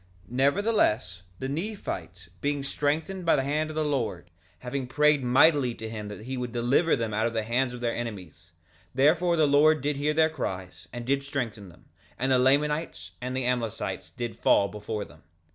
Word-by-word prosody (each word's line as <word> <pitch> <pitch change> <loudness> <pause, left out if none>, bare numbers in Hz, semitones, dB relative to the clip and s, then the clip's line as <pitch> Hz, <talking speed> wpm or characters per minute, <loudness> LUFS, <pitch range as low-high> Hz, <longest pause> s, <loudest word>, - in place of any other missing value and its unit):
2:28 - - -19
Nevertheless, 130 - +1
the 130 - -4
Nephites 135 - -5
being 145 -1 -1
strengthened 155 +7 -1
by 165 - +4
the 135 - +1
hand 150 +3 -1
of 155 - -7
the 155 -1 0
Lord, 110 - -2 0.3
having 130 +1 -4
prayed 150 +1 +3
mightily 130 0 +4
to 110 - -7
him 110 -2 -6
that 105 +1 -8
he 130 +2 -4
would 125 -1 -3
deliver 125 +8 +2
them 115 -2 -3
out 110 +2 +1
of 115 - -4
the 110 -1 -1
hands 120 +3 0
of 125 0 -8
their 120 -1 0
enemies, 95 -8 -7 0.4
therefore 165 +6 +4
the 155 - +5
Lord 150 +2 +5
did 145 0 0
hear 150 +2 0
their 160 0 +4
cries, 95 - -5
and 120 -1 -6
did 140 +2 +1
strengthen 120 - -4
them, 85 - -19 0.3
and 130 +2 0
the 130 - +5
Lamanites 140 - +1
and 130 +1 -3
the 130 - -1
Amlicites 120 -3 -2
did 120 -1 -5
fall 100 - +3
before 105 0 -5
them. 75 +2 -17
130 Hz, 195 wpm, -27 LUFS, 110-150 Hz, 0.4 s, the